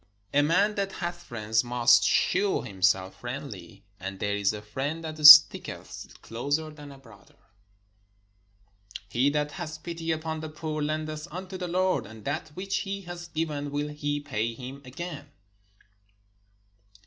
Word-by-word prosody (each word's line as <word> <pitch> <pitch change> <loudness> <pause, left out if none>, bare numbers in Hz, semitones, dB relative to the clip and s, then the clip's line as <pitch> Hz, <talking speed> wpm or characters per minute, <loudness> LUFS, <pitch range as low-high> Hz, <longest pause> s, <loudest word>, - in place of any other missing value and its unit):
A 145 - +5
man 185 +8 +3
that 195 -1 -2
hath 175 -1 -5
friends 110 -6 -1
must 120 -2 +4
shew 190 - +2
himself 95 -1 0
friendly: 115 -7 -8 0.2
and 95 +1 -6
there 100 0 -1
is 100 -1 +1
a 105 - -6
friend 140 +10 -4
that 155 -1 -6
sticketh 150 0 +6
closer 145 +7 -2
than 150 -2 -11
a 140 - -12
brother. 115 -7 -18 1.7
He 125 +6 +2
that 150 0 -1
hath 160 -3 -7
pity 165 -1 -4
upon 160 0 -3
the 155 0 -6
poor 155 0 -4
lendeth 155 +1 -3
unto 185 +3 -7
the 180 -1 -4
Lord; 180 - 0
and 110 -1 -13
that 145 +4 -3
which 195 +2 -2
he 200 -1 -4
hath 175 -1 -9
given 150 -3 -2
will 145 +1 -2
he 145 0 -2
pay 115 -5 -3
him 130 +3 -9
again. 145 +2 -7
150 Hz, 150 wpm, -27 LUFS, 120-165 Hz, 1.7 s, sticketh